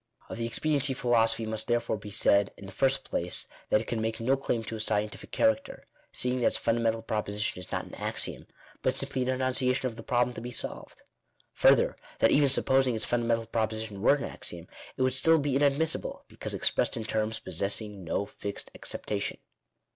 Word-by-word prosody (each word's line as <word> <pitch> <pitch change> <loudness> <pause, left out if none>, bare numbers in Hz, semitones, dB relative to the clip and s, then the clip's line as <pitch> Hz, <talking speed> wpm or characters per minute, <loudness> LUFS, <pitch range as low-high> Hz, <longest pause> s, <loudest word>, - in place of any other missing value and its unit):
Of - - -6
the 115 - -1
expediency 140 +2 +1
philosophy 115 -2 +3
it 110 - -4
must 110 0 -1
therefore 120 -2 0
he 105 - -8
said, 100 0 +3
in 100 - -10
the 95 - -8
first 135 +5 +1
place, 90 +1 -1 0.2
that 105 - +4
it - - -7
can 115 -2 -1
make 110 +1 -2
no 125 +4 +2
claim 125 -4 -1
to 110 - -5
a - - -8
scientific 105 -1 -2
charac 280 0 +3
ter, - - -10 0.3
seeing 125 0 0
that 120 - +3
its - - +1
fundamental 115 -1 +1
proposition 105 -2 -2
is 90 - -9
not - - -2
an - - -13
axiom, - - -3 0.4
hut - - +2
simply 130 - -2
an 125 - 0
enunciation 130 0 +1
of 120 -3 -3
the - - -6
problem 125 +1 +1
to 115 - -7
he 120 - -5
solved. 120 - -4 0.5
Further, - - +4 0.2
that 115 - +4
even 145 -1 +5
supposing 130 -1 +4
its 110 - -1
fundamental 115 -1 +1
proposition 110 -2 -2
were 130 - +6
an 145 - -4
axiom, 85 0 -5 0.3
it 130 - +1
would 130 0 +2
still 160 +5 +5
be 145 -3 0
inadmissible, 145 +3 +1
because - - -5
expressed - - +1
in 115 - -3
terms 110 0 -1
possessing 100 +2 -2
no 85 +4 -1
fixed 100 0 -6
acceptation. - - -3
115 Hz, 200 wpm, -29 LUFS, 110-130 Hz, 0.5 s, were